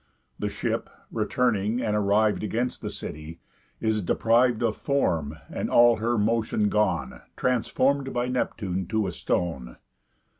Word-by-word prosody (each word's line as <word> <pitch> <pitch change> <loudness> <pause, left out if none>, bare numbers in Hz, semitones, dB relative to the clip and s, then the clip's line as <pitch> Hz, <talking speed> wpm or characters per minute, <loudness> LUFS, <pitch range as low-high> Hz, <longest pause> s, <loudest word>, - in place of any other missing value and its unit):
The - - -1
ship - - -3 0.2
(returning, 115 -2 0
and 110 -4 0
arriv'd 105 +1 +2
Against 120 +4 -2
the - - -4
city) 75 +2 -8 0.4
is 110 -1 0
depriv'd 115 +5 +2
Of 110 -2 +1
form, 80 - 0
and, - - -4
all 120 -1 +6
her 115 +2 0
motion 110 -1 +1
gone, 95 -11 0 0.2
Transform'd 130 +2 +1
by 120 0 -1
Neptune 95 -7 -2
to 110 0 0
a 95 - -2
stone. 70 -9 -2
110 Hz, 135 wpm, -26 LUFS, 95-120 Hz, 0.4 s, all